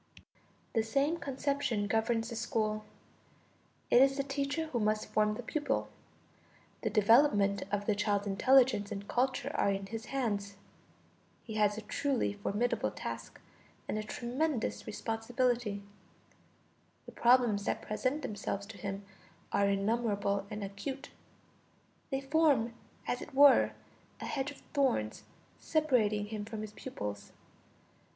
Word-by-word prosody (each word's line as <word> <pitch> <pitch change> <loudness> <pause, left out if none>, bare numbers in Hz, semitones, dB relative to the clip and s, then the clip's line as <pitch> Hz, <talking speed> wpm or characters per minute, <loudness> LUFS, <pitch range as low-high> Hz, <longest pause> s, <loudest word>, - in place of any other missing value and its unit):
The 225 - +3
same 275 +9 +1
conception 275 -6 -1
governs 225 +2 +1
the 235 - -5
school: 215 -2 -1 1.1
it 245 - +7
is 270 +1 +5
the 275 - +1
teacher 280 +3 -2
who 265 -6 -2
must 215 0 +1
form 210 0 +1
the 245 - -6
pupil; 295 +5 -1 0.9
the 220 - 0
development 210 -2 +4
of 205 0 -1
the 215 - +2
child's 205 0 0
intelligence 230 +1 +4
and 200 0 -5
culture 255 +2 0
are - - +2
in 195 0 -1
his 225 +3 -6
hands. 205 -7 -2 0.9
He 220 - -7
has 210 -1 +2
a 220 - -5
truly 255 +1 0
formidable 205 +4 0
task - - -7 0.5
and 215 - -1
a - - -3
tremendous 245 +4 -2
responsibility. 225 -1 -1 1.2
The - - -10
problems 235 -5 +4
that - - -1
present 255 +7 -1
themselves 205 -1 -3
to 205 0 -11
him 195 -1 -5 0.5
are 200 0 +3
innumerable 200 -1 0
and 210 0 -5
acute; 265 +8 -6 1.0
they 270 -1 -1
form 275 -5 +3 0.3
as 245 - -2
it 295 - -9
were 285 0 +7 0.5
a - - -5
hedge 275 0 -2
of 285 - -12
thorns 255 - +1 0.3
separating 240 -10 +2
him 210 0 -5
from 220 0 -6
his 215 -1 -6
pupils. 105 - -6
225 Hz, 130 wpm, -32 LUFS, 205-265 Hz, 1.2 s, it